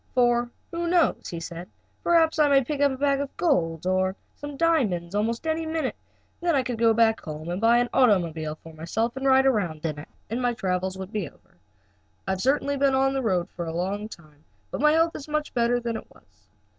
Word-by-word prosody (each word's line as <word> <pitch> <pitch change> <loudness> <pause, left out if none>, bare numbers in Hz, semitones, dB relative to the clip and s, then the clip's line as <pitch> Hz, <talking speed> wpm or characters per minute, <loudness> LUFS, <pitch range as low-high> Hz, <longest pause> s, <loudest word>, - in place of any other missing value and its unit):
"For, 240 -1 +3 0.2
who 340 0 -2
knows?" 345 -1 +2
he 170 - -5
said, 170 +2 -7 0.3
"perhaps 325 -2 +3
I 295 -1 +5
may 275 -1 +5
pick 285 +3 -3
up 285 -1 +4
a 265 - -4
bag 280 0 +1
of 280 - -6
gold, 165 - +1
or 185 +1 +1 0.2
some 290 -1 -8
diamonds 215 - +1
at - - 0
almost 230 +6 -2
any 320 0 0
minute. 320 0 -2 0.4
Then 345 -2 +1
I 265 - +2
could 245 -3 -4
go 230 -1 +5
back 225 0 +3
home 155 +1 -7
and 180 +3 -3
buy 230 +1 +5
an 240 0 +1
automobile 170 -10 +2
for 165 +1 -14
myself 220 +9 -2
to 265 - -6
ride 265 0 +4
around 180 -12 0
in, 150 -2 -3 0.2
and 235 +3 -3
my 245 -1 +1
travels 185 -1 -2
would 190 +1 -7
be 205 -9 -3
over. - - -28 0.7
I - - +1
have 190 -1 -2
certainly 280 +2 +1
been 275 -1 +3
on 270 0 +2
the 270 - -1
go 185 -7 0
a 165 -1 -2
long 195 +5 -3
time, 155 -6 -15 0.3
but - - -4
my 300 +1 +5
health 330 +1 +2
is 285 - -7
much 305 0 -2
better 240 0 +2
than 235 -1 -3
it - - -7
was." 105 0 -25
235 Hz, 220 wpm, -25 LUFS, 180-280 Hz, 0.7 s, I